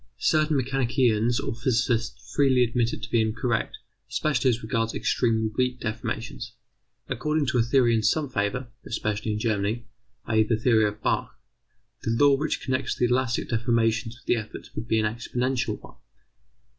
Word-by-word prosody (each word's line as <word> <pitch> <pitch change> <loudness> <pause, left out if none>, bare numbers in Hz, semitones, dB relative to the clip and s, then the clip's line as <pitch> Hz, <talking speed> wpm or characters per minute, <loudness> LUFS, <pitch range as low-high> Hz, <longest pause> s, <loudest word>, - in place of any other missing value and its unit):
Certain 155 +1 +2
mechanicians 120 -3 +1
or - - -3
physicists 120 -1 -1
freely 130 -3 +4
admit 120 0 +1
it - - -7
to - - -6
be 115 - +4
incorrect, 115 +1 -1 0.3
especially 150 -3 +1
as 120 -1 -1
regards 115 0 -1
extremely 110 -2 +1
weak 125 0 0
deformations. 115 0 -4 0.5
According 150 -1 0
to 125 - +1
a - - +6
theory 120 0 +3
in 110 - +2
some 145 +8 +1
favour, 120 +2 -2
especially 110 0 -2
in - - -2
Germany, 110 +1 -1 0.4
i.e. 110 0 +3
the 110 +1 +2
theory 110 -1 +3
of 105 +1 -7
Bach, - - -1 0.6
the - - -3
law 140 +5 +5
which 150 +3 -2
connects 130 0 -1
the 125 - +1
elastic 125 0 0
deformations 115 0 +1
with - - -22
the 120 - +2
efforts 110 -1 -8
would 115 - -5
be 110 - +2
an 110 - +1
exponential 125 +3 -1
one. - - -15
115 Hz, 165 wpm, -26 LUFS, 110-130 Hz, 0.6 s, a